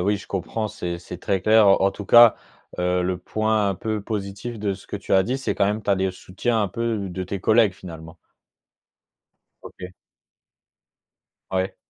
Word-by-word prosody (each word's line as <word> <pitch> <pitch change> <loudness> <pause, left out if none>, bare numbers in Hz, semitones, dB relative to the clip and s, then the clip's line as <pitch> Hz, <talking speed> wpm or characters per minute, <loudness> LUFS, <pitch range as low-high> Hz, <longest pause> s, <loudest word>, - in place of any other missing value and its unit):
oui 100 +3 +1
je 100 - -11
comprends, 100 +4 -3
c'est 90 -5 -5
c'est 90 0 -9
très 95 0 -1
clair. 110 +1 +5
En 95 0 +4
tout 105 - -8
cas, 120 +1 +8 0.5
heu, 90 0 +1
le 90 0 -1
point 110 +3 0
un 100 - -1
peu 110 +1 -3
positif 100 +2 -5
de 100 -2 -1
ce 95 - -15
que - - -4
tu 100 - -6
as 95 - +5
dit, 125 +7 -2
c'est 135 - -2
quand 100 - +2
même 105 +2 -1
tu - - 0
as - - +5
des 95 0 0
soutiens 95 +5 -2
un - - +1
peu 110 -1 -2
de 95 +1 -5
tes 95 +2 -4
collègues, 110 0 +4
finalement. 80 -3 -11 1.5
OK. 90 0 -10 1.6
Ouais. 95 0 -1
100 Hz, 185 wpm, -23 LUFS, 95-110 Hz, 1.6 s, cas